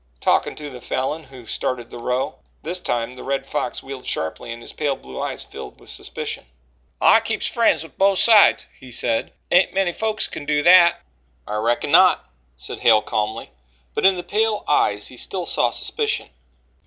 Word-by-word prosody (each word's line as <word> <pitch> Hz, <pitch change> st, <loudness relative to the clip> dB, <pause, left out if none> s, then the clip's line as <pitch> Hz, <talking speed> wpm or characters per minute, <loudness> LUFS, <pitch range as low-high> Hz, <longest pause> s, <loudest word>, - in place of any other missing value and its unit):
"Talking -, -, +1 dB
to 150 Hz, -, -7 dB
the 125 Hz, -3 st, -9 dB
Falin 145 Hz, +7 st, -3 dB
who 130 Hz, -3 st, -13 dB
started 120 Hz, +1 st, -3 dB
the 120 Hz, -, -8 dB
row." 125 Hz, +2 st, -2 dB, 0.2 s
This 175 Hz, +4 st, -2 dB
time 120 Hz, -7 st, -2 dB
the 125 Hz, -, -10 dB
Red 135 Hz, 0 st, -2 dB
Fox 135 Hz, -3 st, -3 dB
wheeled 135 Hz, -1 st, -8 dB
sharply 80 Hz, +8 st, -3 dB
and 115 Hz, -, -6 dB
his 120 Hz, -, -8 dB
pale 145 Hz, -2 st, -1 dB
blue 65 Hz, -, -9 dB
eyes -, -, -3 dB
filled -, -, -10 dB
with -, -, -11 dB
suspicion. -, -, -5 dB, 0.5 s
"I -, -, +6 dB
keeps -, -, -3 dB
friends 230 Hz, -7 st, +2 dB
with 160 Hz, -4 st, -16 dB
both 195 Hz, 0 st, +4 dB
sides," 220 Hz, -1 st, +6 dB
he 130 Hz, -2 st, -12 dB
said. 115 Hz, -1 st, -1 dB, 0.2 s
"Ain't 180 Hz, +1 st, +4 dB
many 190 Hz, -3 st, +1 dB
folks 220 Hz, +1 st, -1 dB
can -, -, -7 dB
do 150 Hz, 0 st, +1 dB
that." 175 Hz, 0 st, +6 dB, 0.4 s
"I 105 Hz, -, -3 dB
reckon 120 Hz, +6 st, 0 dB
not," 180 Hz, -, +5 dB, 0.3 s
said -, -, -7 dB
Hale 110 Hz, -2 st, +5 dB
calmly, 110 Hz, 0 st, -3 dB, 0.4 s
but -, -, -2 dB
in 190 Hz, 0 st, +6 dB
the 175 Hz, -, -5 dB
pale 215 Hz, +3 st, 0 dB
eyes 105 Hz, -8 st, +2 dB
he 125 Hz, -, -10 dB
still 180 Hz, +7 st, -3 dB
saw -, -, +2 dB
suspicion. 440 Hz, -2 st, -1 dB
140 Hz, 185 wpm, -21 LUFS, 120-180 Hz, 0.5 s, I